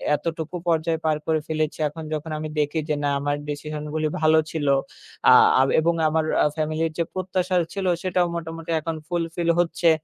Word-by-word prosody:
এতটুকু 165 +2 -4
পর্যায়ে 160 -1 +1
পার 155 -1 +2
করে 160 -1 +2
ফেলেছি, 155 -1 -1
এখন 160 +2 -9
যখন 155 +1 -4
আমি 155 0 -4
দেখি 150 +2 0
যে 150 - +2
না 145 - +2
আমার 145 +1 0
ডিসিশন 150 +1 -5
গুলি 155 -1 0
ভালো 155 0 +5
ছিল, 150 -3 -2 0.6
আ - - +10 0.3
আ - - +6
বে - - 0
এবং 170 +2 +2 0.2
আমার 160 0 +1 0.2
আ - - +3
ফ্যামিলি 155 +1 -1
যে 170 - +2
প্রত্যাশা 185 0 -1 0.2
ছিলো 195 -2 -1
সেটাও 180 -1 +2
মোটামুটি 165 0 -5
এখন 165 +1 -4
fulfill 170 -1 -2
হচ্ছে। 170 0 +2
160 Hz, 185 wpm, -24 LUFS, 155-170 Hz, 0.6 s, আ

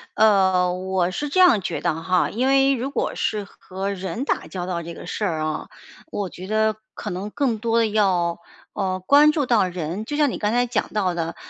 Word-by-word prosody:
呃， 190 -4 +4
我 185 -1 -1
是 295 +10 -3
这 370 - 0
样 350 - +6
觉 - - -3
得 160 +1 -1
哈， 180 +1 +1
因 250 +5 0
为 270 0 +4
如 260 +1 -2
果 - - -2
是 210 -1 -1
和 195 0 -6
人 195 +6 -4
打 - - -1
交 180 -2 -5
道 175 -2 -3
这 170 0 -7
个 - - -10
事 180 - -4
啊， 155 -4 -2 0.4
我 200 -2 -3
觉 185 +1 -9
得 215 +1 +1 0.2
可 210 - -5
能 190 +3 -4
更 255 -4 0
多 230 +1 0
的 230 - +3
要， 185 -6 +1 0.3
呃， 185 -1 -2
关 290 +6 +6
注 300 -2 0
到 225 -6 +3
人， 175 +2 -4
就 290 - -4
像 295 -2 +3
你 - - -4
刚 210 - 0
才 245 +1 +2
讲 230 -2 -1
到 195 -4 +1
的， 165 -1 -3
200 Hz, 230 characters per minute, -23 LUFS, 180-235 Hz, 0.4 s, 样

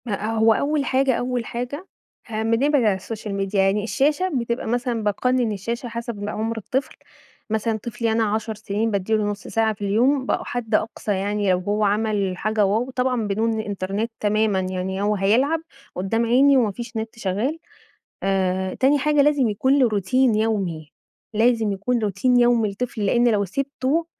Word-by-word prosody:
ما 210 -2 -3
هو 220 0 +5
أول 285 +3 0
حاجة، 265 0 +2
أول 245 -1 -2
حاجة 250 - -5 0.4
آآ 220 -1 -2
بنبعد 255 +5 +2
عن 205 -3 +2
الsocial 215 +2 -7
media، 195 +1 -3
يعني 195 +1 +2
الشاشة 290 - +1
بتبقى 235 -1 -2
مثلًا 240 -1 -1
باقنن 240 +3 +1
الشاشة 235 +5 -4
حسب 230 -3 -5
عُمْر 225 +2 -3
الطفل، 260 +5 -3 0.5
مثلًا 220 +1 0
طفلي 230 +1 -3
أنا 225 +1 +2
10 220 +1 -1
سنين 210 +2 -2
بادِّي 200 +1 -1
له 215 -1 +2
نُص 205 0 -4
ساعة 220 -1 +1
في 205 - -19
اليوم 250 +7 +2
بقوا - - -1
حد 245 -3 -2
أقصى 220 -1 -2
يعني 200 0 0
لو 180 - +2
هو 205 +3 -1
عمل 205 -2 +1
حاجة 215 +2 0
wow 220 +6 0
طبعًا 250 -3 0
بدون 220 +2 0
الإنترنت 205 +1 -3
تمامًا 215 -1 +1
يعني، 185 +1 -3
هو 210 +1 +1
هيلعب 240 +11 +2 0.4
قدّام 225 +6 0
عيني 270 +4 +5
وما 225 -5 +2
فيش 235 +2 -7
نت 220 0 -5
شغال، 225 - -1 0.6
آآ، 190 -1 0
تاني 275 +3 +3
حاجة 295 +1 +3
لازم 285 -4 +3
يكون 260 +7 +2
له 255 -3 +4
روتين 225 +4 +2
يومي 195 -8 -1 0.4
لازم 225 -1 +2
يكون 225 +6 -1
روتين 215 +5 +1
يومي 240 -3 +3
لطفل 215 0 -3
لأن 240 +4 +3
لو 210 -3 +2
سِبته 275 - -1
220 Hz, 170 wpm, -22 LUFS, 205-245 Hz, 0.6 s, هو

